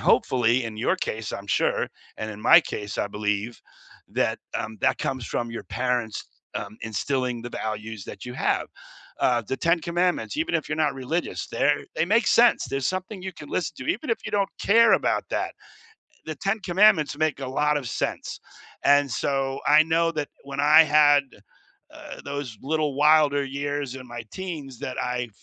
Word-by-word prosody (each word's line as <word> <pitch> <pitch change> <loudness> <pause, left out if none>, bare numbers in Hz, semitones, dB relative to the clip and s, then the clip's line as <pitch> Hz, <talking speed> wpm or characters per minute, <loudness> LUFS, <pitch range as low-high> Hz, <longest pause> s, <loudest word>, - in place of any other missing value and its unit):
hopefully, 120 0 +3
in 110 -1 -6
your 115 - +1
case, 110 -1 -4
I'm 100 - -6
sure, 90 - +1 0.3
and 110 - -4
in 105 0 -9
my 115 - +8
case, 105 -1 -6
I - - +1
believe, 105 +2 -2 0.5
that - - 0 0.2
um, 110 - -3
that - - +2
comes 130 -4 -3
from 120 -1 -3
your 115 - -6
parents, 125 -4 -2 0.3
um, 105 +2 -6
instilling 120 +4 -2
the 120 - -5
values 110 -2 -5
that 100 - -9
you 125 - -6
have, - - 0 0.5
uh, 120 -2 +2
The 130 +5 -4
Ten 170 +1 +2
Commandments, 175 - -1
even 315 - -1
if 165 - 0
you're 155 - -2
not 155 -2 +1
religious, 135 +6 -3
they're - - +1
they - - +2
make 215 +5 +2
sense. 240 +1 +5
There's 135 -1 -2
something 185 +1 -3
you 190 0 -5
can 150 -4 -11
listen 175 - -2
to, 130 - -7
even 270 +8 -8
if 230 - +1
you - - -4
don't 200 -1 +1
care 230 +3 +5
about - - +2
that. - - -1 0.6
Eh, - - -32
The 155 - -5
Ten 195 +6 -1
Commandments 180 -5 +3
make 155 -2 0
a 135 - -4
lot 150 +3 +1
of 135 -5 -4
sense, - - -3 0.5
and 145 -1 +4
so, 135 +1 -1
I 155 +1 +7
know 165 +1 +2
that 150 -3 -3 0.2
when 140 0 -7
I 150 +2 +8
had, 145 -2 +5 0.7
uh, - - -10
those 140 -5 -5
little 150 -1 -1
wilder 150 -1 +4
years 140 -1 -3
in 130 - -9
my 120 -1 -7
teens 155 -9 -6
that 130 - -5
I 125 -1 -2
140 Hz, 185 wpm, -25 LUFS, 120-160 Hz, 0.7 s, my